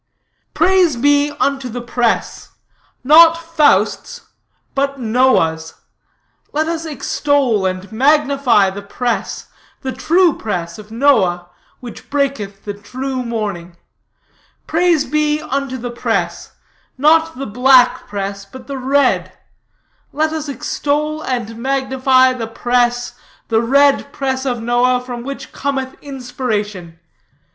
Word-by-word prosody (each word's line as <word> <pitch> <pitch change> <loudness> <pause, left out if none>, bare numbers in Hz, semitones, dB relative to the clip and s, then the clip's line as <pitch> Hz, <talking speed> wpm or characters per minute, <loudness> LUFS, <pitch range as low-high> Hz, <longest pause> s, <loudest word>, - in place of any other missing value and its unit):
"'Praise 370 -6 +3
be 285 +3 +3
unto 275 -2 0
the 245 +2 -5
press, 240 -1 -2 0.5
not 325 +4 +7
Faust's, 330 +8 0 0.4
but 275 0 -1
Noah's; 220 -10 +1 0.8
let 310 +2 0
us 330 0 -3
extol 280 -8 0
and 185 +2 -5
magnify 275 -5 +3
the 200 +1 -7
press, 235 +4 -3 0.3
the 265 - -3
true 340 +3 +2
press 175 -4 -4
of 210 0 -12
Noah, 205 -9 +2 0.3
from - - -39
which 240 -2 -10
breaketh 265 -9 -2
the 205 - -4
true 255 +6 -5
morning. 200 -7 -5 0.9
Praise 335 -2 +2
be 300 0 0
unto 275 -3 -3
the 245 0 -5
press, 240 - -3 0.4
not 320 +2 +3
the 275 - -4
black 250 +3 +4
press 200 0 -5
but 225 +7 -13
the 275 -1 -6
red; 275 +2 +1 0.7
let 310 +1 0
us 310 -2 -4
extol 300 +2 -2
and 235 -5 -4
magnify 260 0 +2
the 235 -3 -5
press, 245 +1 0 0.4
the 225 -1 +2
red 280 +3 +3
press 265 -1 -2
of 240 -3 -2
Noah, 245 +1 +2
from 250 -1 -7
which 275 +3 -7
cometh 270 -2 -3
inspiration. 215 - -4
260 Hz, 120 wpm, -17 LUFS, 225-285 Hz, 0.9 s, not